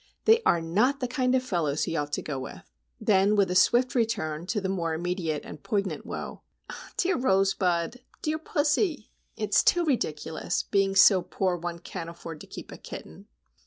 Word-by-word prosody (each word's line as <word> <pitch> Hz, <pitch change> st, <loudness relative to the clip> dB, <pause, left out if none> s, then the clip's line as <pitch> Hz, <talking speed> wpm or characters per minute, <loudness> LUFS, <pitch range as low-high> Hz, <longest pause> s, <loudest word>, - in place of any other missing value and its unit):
They 450 Hz, +1 st, +6 dB
are 170 Hz, -, +4 dB
not 215 Hz, +12 st, +1 dB
the 250 Hz, -, -1 dB
kind 255 Hz, +1 st, +1 dB
of 255 Hz, -, +1 dB
fellows 165 Hz, -, 0 dB
he 165 Hz, -, -2 dB
ought 145 Hz, -1 st, -2 dB
to -, -, -1 dB
go 140 Hz, -3 st, -4 dB
with." 130 Hz, -, -8 dB, 0.4 s
Then, 200 Hz, +1 st, +3 dB
with 195 Hz, -3 st, +3 dB
a -, -, -1 dB
swift 240 Hz, +7 st, +4 dB
return 175 Hz, -9 st, -1 dB
to 210 Hz, -, 0 dB
the 190 Hz, -, -2 dB
more 170 Hz, -4 st, -1 dB
immediate 170 Hz, -3 st, -2 dB
and 150 Hz, -, -9 dB
poignant 195 Hz, -7 st, -2 dB
woe,—"Dear 370 Hz, -2 st, -4 dB
Rosebud! 190 Hz, -3 st, +1 dB, 0.2 s
dear 310 Hz, +1 st, -1 dB
pussy! 300 Hz, -, 0 dB, 0.3 s
It's 210 Hz, -1 st, +3 dB
too 350 Hz, -1 st, +3 dB
ridiculous,—being 195 Hz, -, -1 dB
so 195 Hz, -1 st, +7 dB
poor 180 Hz, +1 st, -1 dB
one 175 Hz, 0 st, -5 dB
can't 165 Hz, 0 st, -7 dB
afford 165 Hz, -2 st, -9 dB
to -, -, -11 dB
keep -, -, -9 dB
a -, -, -8 dB
kitten!" 80 Hz, -, -10 dB
190 Hz, 170 wpm, -27 LUFS, 165-245 Hz, 0.4 s, so